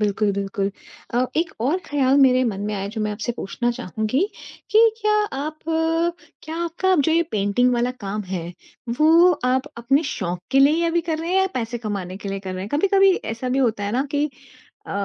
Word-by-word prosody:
बिल्कुल, 210 0 +1
बिल्कुल। 195 0 -2 0.4
अ, 245 +1 +3
एक 330 +1 +1
और 280 +10 +1
ख़्याल 275 -2 +2
मेरे 255 -1 +5
मन 205 -5 -2
में 210 - -2
आया, 195 0 -3
जो 220 +2 -5
मैं 210 0 -1
आपसे 225 +3 -3
पूछना 240 +5 -2
चाहूँगी 225 +1 -2 0.5
कि 430 - +5 0.2
क्या 425 0 +2 0.3
आप 305 +2 -4 0.8
क्या 320 +1 -6
आपका 370 +3 +1
जो 320 - +2
ये 335 - +4
पेंटिंग 210 +5 +2
वाला 240 +1 +1
काम 205 +1 -3
है, 175 -2 -4 0.5
वो 330 +4 +6
आप 260 +2 +1
अपने 270 +6 +2
शौक 180 -10 -3
के 270 - +3
लिए 275 +2 +6
ही 340 - +1
अभी 335 0 +2
कर 315 -1 0
रहे 335 +2 -4
हैं 380 - +3
या 380 - +3
पैसे 235 -1 -3
कमाने 200 -5 -4
के 200 0 -7
लिए 195 0 -3
कर 190 -1 -6
रहे 185 - -4
हैं? 200 - -6
कभी-कभी 390 +4 +4
ऐसा 230 +3 -4
भी 260 - 0
होता 225 -6 +1
है 205 - -2
ना 260 +3 +1
कि 290 +1 +2 0.6
अ, - - -8
245 Hz, 210 wpm, -22 LUFS, 205-305 Hz, 0.8 s, वो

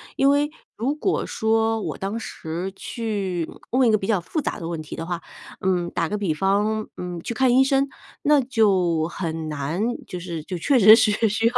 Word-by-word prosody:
因 275 - +4
为 290 +1 +2 0.3
如 255 +6 0
果 375 +5 -1
说， 225 0 +1
我 - - -4
当 200 +4 -3
时 175 -3 -5
去 195 -9 -3 0.2
问 255 -1 +4
一 - - +4
个 215 - +4
比 195 - -5
较 200 -5 +1
复 310 - -3
杂 - - -3
的 165 - -5
问 165 -1 -3
题 155 - -8
的 165 - -5
话， 175 -2 -3 0.4
嗯， 180 -2 +1
打 165 - -1
个 210 - -2
比 190 -6 0
方， 205 +4 +1
嗯， 180 -1 -5
去 - - -3
看 255 +2 +3
医 265 - +7
生， 275 +1 +2 0.3
那 290 -1 +4
就 190 -10 +2
很 165 -3 -4
难， 150 +5 -3 0.3
就 180 - -5
是 170 -3 -5
就 180 +1 -5
确 275 - +3
实 215 +1 +10
是 220 0 +3
需 220 +2 +1
要 235 - 0
205 Hz, 225 characters per minute, -23 LUFS, 175-230 Hz, 0.4 s, 实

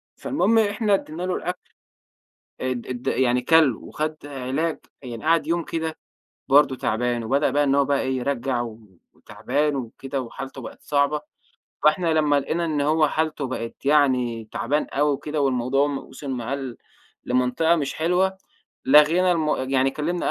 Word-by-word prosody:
فالمهم 225 -4 +1
إحنا 210 0 +1
ادّينا 175 -2 -2
له 185 0 -1
الأكل. 180 +2 -4 1.0
أد 130 -2 -3
أد 125 -1 -6
يعني 125 -1 +2
كَل، 150 -2 +4
وخد 155 0 -4
علاج، 140 +4 -2 0.2
يعني 120 0 -7
قعد 165 0 +3
يوم 170 0 0
كده 160 -1 -3 0.5
برضه 135 -1 +5
تعبان، 120 -1 -1
وبدأ 140 +5 +1
بقى 145 +1 +2
إن 140 -1 +2
هو 140 0 +4
بقى 140 0 +1
إيه 130 0 -1
يرجّع، 125 -1 -1 0.5
وتَعبان 135 +8 -2
وكده، 135 +2 -5
وحالته 135 +2 -7
بقت - - -10
صعبة، 145 +1 +1 0.6
فإحنا 165 +2 +3
لمّا 150 -2 +3
لقينا 170 +5 -2
إن 155 -3 -1
هو 155 +1 +3
حالتُه 155 -3 -1
بقت 120 +1 -6
يعني 125 -6 +2
تَعبان 150 +2 0
أوي 145 0 +1
كده، 150 0 -2
والموضوع 135 +1 +2
م 140 -2 -2
وصل 140 -2 -9
معاه 125 +1 -3
ل 135 -4 -5 0.5
لمَنطقة 125 +7 +2
مش 145 -4 -2
حلوة، 180 +4 +1 0.5
لَغينا 160 +6 +5
المو 155 -3 +1
يعني 130 0 +1
كَلّمنا 165 +5 -2
140 Hz, 155 wpm, -23 LUFS, 130-160 Hz, 1.0 s, برضه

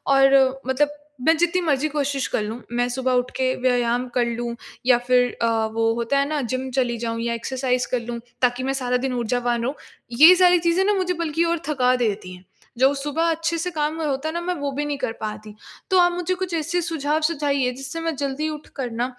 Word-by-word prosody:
और 270 -1 +4
मतलब 275 +3 +2 0.4
मैं 325 - +6
जितनी 345 +2 +1
मर्ज़ी 300 -3 +1
कोशिश 280 -2 -1
कर - - -1
लूँ, 220 +3 -5
मैं 245 0 +1
सुबह 260 +1 -1
उठ 250 0 +1
के 260 0 +1
व्यायाम 245 -1 +1
कर 245 -1 +3
लूँ 235 0 -3 0.3
या 250 -1 +6
फिर 250 -1 +4
अ, 230 - +3 0.3
वो 225 0 +1
होता 235 +4 0
है 280 - +1
ना, 305 -2 -1
जिम 255 +1 -3
चली 245 -2 0
जाऊँ 230 0 -3
या 235 0 -1
एक्सरसाइज़ 250 +1 -1
कर 250 - +1
लूँ, 235 0 -5 0.2
ताकि 250 0 +1
मैं 270 +1 0
सारा 250 -2 0
दिन 260 - -3
ऊर्जावान 240 0 -1
रहूँ। 265 +5 -2 0.4
ये 320 +4 +10
सारी 360 -1 +5
चीज़ें 340 +2 +2
ना, 415 - +3
मुझे 370 -2 0
बल्कि 330 -1 -1
और 340 0 0
थका 255 -4 +2
देती 205 -6 -2
हैं। 180 - -17 0.3
जो 265 +3 +4
सुबह 295 +4 -1
अच्छे 330 +1 -1
से 330 +2 -2
काम 305 -1 -1
होता 290 -1 -1
है - - -5
ना, 340 - -2
मैं 360 +1 -1
वो 285 -3 -3
भी 285 +2 -2
नहीं 290 -1 -2
कर 250 - -2
पाती। 215 0 -6 0.4
तो 375 - +5
आप 350 0 +5
मुझे 355 +1 -2
कुछ 365 -2 -2
ऐसे 330 +2 -1
सुझाव 315 -2 -1
सुझाइए, 280 -5 0
जिससे 270 +5 -6
मैं 330 -1 -2
जल्दी 280 +2 -2
उठकर 290 -4 -6
ना 235 +2 -1
270 Hz, 220 wpm, -23 LUFS, 245-315 Hz, 0.4 s, ये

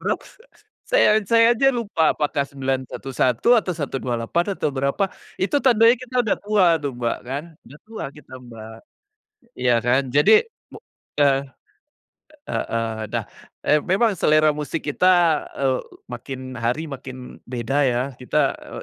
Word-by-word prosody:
Beraks - - -4 0.5
saya 220 - +4
saya 230 +3 +4
aja 270 +3 +3
lupa, 210 -10 +1
apakah 145 -1 0
911, 135 - -2
atau 210 -5 +1
128 135 -1 -2
atau 145 - -1
berapa, 140 +9 0 0.3
itu 200 +10 0
tandanya 230 -2 +5
kita 255 0 -12
udah 225 -4 +1
tua 205 -2 +3 0.2
tuh 140 - -2
Mbak 120 -1 -1
kan, 135 +4 -4 0.2
udah 150 - -15
tua 220 0 -7
kita, 150 -2 -17
Mbak. 110 -2 -11 0.8
Iya 125 -1 +1
kan, 125 +3 +2
jadi, 150 - +5 0.2
mu - - -12 0.4
eh, 140 -2 +3 1.1
heeh 115 -2 -3
nah, - - -3 0.4
eee, 150 0 +3
memang 205 +4 +2
selera 155 -3 +3
musik 150 +2 -5
kita, 150 +4 0 0.5
eee, 130 -2 0 0.3
makin 130 +1 -7
hari 125 +8 -1
makin 130 -3 -9
beda 125 +2 -2
ya. 120 0 0 0.2
Kita, 140 +2 +1
e - - -14
145 Hz, 135 wpm, -22 LUFS, 130-195 Hz, 1.1 s, tandanya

